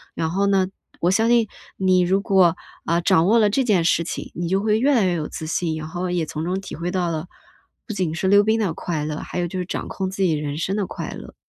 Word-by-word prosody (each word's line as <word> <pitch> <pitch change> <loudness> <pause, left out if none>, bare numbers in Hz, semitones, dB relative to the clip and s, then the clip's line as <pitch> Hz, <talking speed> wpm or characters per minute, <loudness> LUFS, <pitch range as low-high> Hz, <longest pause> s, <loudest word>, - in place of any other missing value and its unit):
然 160 - -1
后 200 +3 +1
呢， 195 -2 +3 0.3
我 175 - +3
相 225 +4 +2
信 235 -2 +4 0.3
你 185 -1 +3
如 185 +2 +2
果， 190 -5 +4 0.3
呃， 170 +1 +2
掌 165 0 +3
握 225 +4 +5
了 210 -2 +4
这 265 +6 +1
件 205 -8 +2
事 170 - +3
情， 170 - -6
你 175 0 -2
就 190 +2 +2
会 215 +1 +2
越 280 +4 +3
来 220 -5 +3
越 180 - +1
有 155 -3 -2
自 160 - -6
信， 165 0 -1
以 155 - -4
后 175 +4 -4
也 175 -2 0
从 155 +1 -5
中 180 +3 -1
体 195 - -8
会 170 +2 -3
到 180 -2 0
了， 160 +1 -4 0.6
不 220 - -4
仅 185 -5 -1
是 180 +3 -1
溜 205 +1 +6
冰 220 +2 +2
的 195 -7 0
快 160 -3 -3
乐， 150 0 -3
还 - - -5
有 175 - 0
就 185 - -6
是 180 - -2
掌 - - -4
控 190 -1 -3
自 195 - -5
己 180 -4 +3
人 150 -1 -3
生 185 +5 -1
的 205 -2 0
快 - - -6
乐。 - - -10
185 Hz, 295 characters per minute, -22 LUFS, 170-200 Hz, 0.6 s, 溜